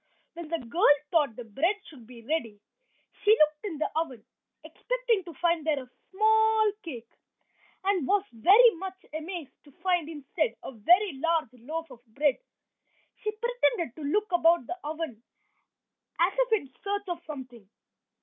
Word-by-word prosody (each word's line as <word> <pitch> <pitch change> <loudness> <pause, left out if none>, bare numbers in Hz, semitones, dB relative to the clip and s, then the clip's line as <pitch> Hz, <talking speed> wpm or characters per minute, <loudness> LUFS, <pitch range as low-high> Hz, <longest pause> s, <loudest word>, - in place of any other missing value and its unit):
When 340 -1 -8
the 335 +2 -1
girl 290 +4 +4 0.2
thought 295 -9 +2
the 245 - -7
bread 280 - 0
should 250 -8 -14
be 235 -2 -13
ready 230 -7 -2 0.6
she 430 +2 +6
looked 305 0 +3
in 350 -7 -4
the 310 - 0
oven 265 -9 -3 0.4
expecting - - -1
to 340 - -9
find 340 0 +1
there 295 -3 0
a 250 - -19 0.2
small 440 +2 +4
cake, 240 -8 -8 0.7
and 380 -7 +1
was 405 0 +2
very 405 - +7
much 380 +1 -6 0.2
amazed 315 -2 -5
to 290 - -18
find 350 -2 0
instead 295 -4 -2
a - - -6
very 335 - +3
large 325 -7 +1
loaf 305 +6 -6
of 240 -1 -14
bread. 290 - +2 0.8
She 430 - -1
pretended 460 - 0
to 315 - -10
look 410 +8 0
about 340 -4 +4
the 360 +7 -6
oven 305 -6 -5 1.0
as 350 +3 +3
if - - +1
in 280 -12 0
search 405 0 -2
of 345 -1 -4
something. 250 -8 -9
330 Hz, 160 wpm, -28 LUFS, 270-385 Hz, 1.0 s, very